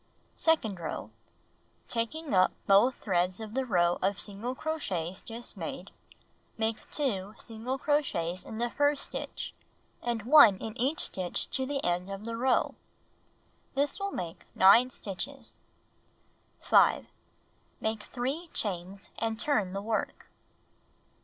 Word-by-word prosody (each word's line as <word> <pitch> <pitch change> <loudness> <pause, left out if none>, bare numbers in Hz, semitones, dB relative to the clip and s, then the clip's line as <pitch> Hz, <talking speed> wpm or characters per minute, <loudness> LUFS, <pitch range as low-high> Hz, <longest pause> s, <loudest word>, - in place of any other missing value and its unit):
Second 225 - +2
row: 165 - -5 0.8
Taking 275 +6 -2
up 185 -1 +5
both 210 +6 +5
threads 180 -1 0
of 220 -1 -7
the 265 0 -1
row 175 -5 +2
of 195 0 +1
single 210 +7 -2
crochets 190 - -3
just 235 +1 -7
made, - - -6 0.7
make 220 0 -2
2 210 -9 -1
single 230 +3 -4
crochets 220 - 0
in 220 - -8
the 240 +1 -1
first 290 +1 +2
stitch, - - -5 0.5
and 235 -3 -2
I 295 - +12
in 215 +4 -7
each 265 +6 +1
stitch 185 -2 -2
to 265 -1 0
the 280 -1 -2
end 175 +2 0
of 195 +2 -6
the 230 0 -3
row. 255 +2 +2 1.0
This 285 +5 +1
will 395 0 -1
make 175 - -6
9 225 +7 +7
stitches. 250 +5 -5 1.0
5. - - +4 0.7
Make 220 -1 -2
3 275 +8 -3
chains, 190 -1 -2
and 225 0 -1
turn 215 -11 +1
the 195 0 -3
work. 220 0 -3
225 Hz, 130 wpm, -30 LUFS, 190-265 Hz, 1.0 s, I